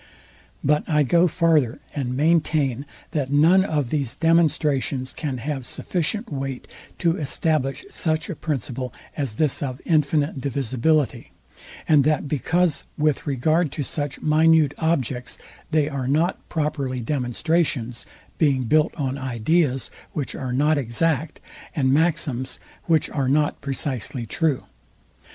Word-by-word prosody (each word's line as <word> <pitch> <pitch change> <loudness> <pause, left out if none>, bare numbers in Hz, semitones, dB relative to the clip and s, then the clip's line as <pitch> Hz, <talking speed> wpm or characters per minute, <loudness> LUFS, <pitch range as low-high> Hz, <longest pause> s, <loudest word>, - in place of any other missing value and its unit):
But 150 +2 +2
I 150 -2 +4
go 170 +6 +4
farther, 160 -8 +2
and 125 -3 -2
maintain, 150 -4 +1 0.2
that 140 -3 -2
none 165 +6 +5
of 150 -9 -1
these 140 -6 -1
demonstrations 150 -5 +1
can 140 -5 -3
have 135 +2 -3
sufficient 185 - -2
weight 135 -2 -4 0.3
to 170 0 +1
establish 150 - -1
such 160 - -1
a 185 - -4
principle, 130 -4 -3 0.2
as 135 -7 -3
this 150 +2 0
of 130 -3 -3
infinite 150 -3 +1
divisibility; 135 +2 0 0.5
and 150 -3 +5
that 150 0 +1
because 160 +3 +1
with 150 0 +1
regard 155 +4 +1
to 145 - -2
such 145 -1 -3
minute 155 -1 +4
objects, 135 -6 -1 0.3
they 155 -2 +2
are 140 -4 -3
not 160 +7 0
properly 145 -5 -1
demonstrations, 125 0 -1 0.3
being 140 -5 +3
built 155 +6 +2
on 135 -2 -2
ideas, 130 +2 0 0.2
which 145 -4 -3
are 130 -2 -4
not 145 +4 +2
exact, 145 +5 -1 0.4
and 130 -3 +2
maxims, 155 -5 0 0.3
which 160 -3 +2
are 135 -3 0
not 145 +1 +1
precisely 130 -3 -2
true. 150 +3 0
145 Hz, 130 wpm, -23 LUFS, 130-160 Hz, 0.5 s, none